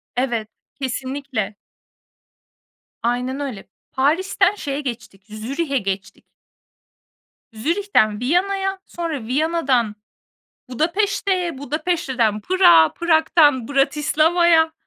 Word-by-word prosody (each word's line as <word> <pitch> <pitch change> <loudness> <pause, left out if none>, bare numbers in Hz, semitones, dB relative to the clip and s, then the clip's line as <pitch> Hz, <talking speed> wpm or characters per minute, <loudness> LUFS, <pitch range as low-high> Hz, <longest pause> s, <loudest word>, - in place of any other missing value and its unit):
Evet, 240 -4 -1 0.3
kesinlikle. 260 -4 -4 1.5
Aynen 250 +3 -1
öyle. 265 -9 -6 0.2
Paris'ten 370 +8 +1
şeye 285 -6 -4
geçtik, 235 -7 -7
Zürih'e 275 +8 -3
geçtik. 195 -3 -5 1.3
Zürih'ten 230 - +1
Viyana'ya, 385 +8 0
sonra 320 -9 -5
Viyana'dan 265 -6 +1 0.8
Budapeşte'ye, 365 - 0
Budapeşte'den 280 - -1
Prag'a, 170 - +5
Prag'tan 315 -6 +3
Bratislava'ya. 320 +4 +3
285 Hz, 75 wpm, -21 LUFS, 240-340 Hz, 1.5 s, Prag'a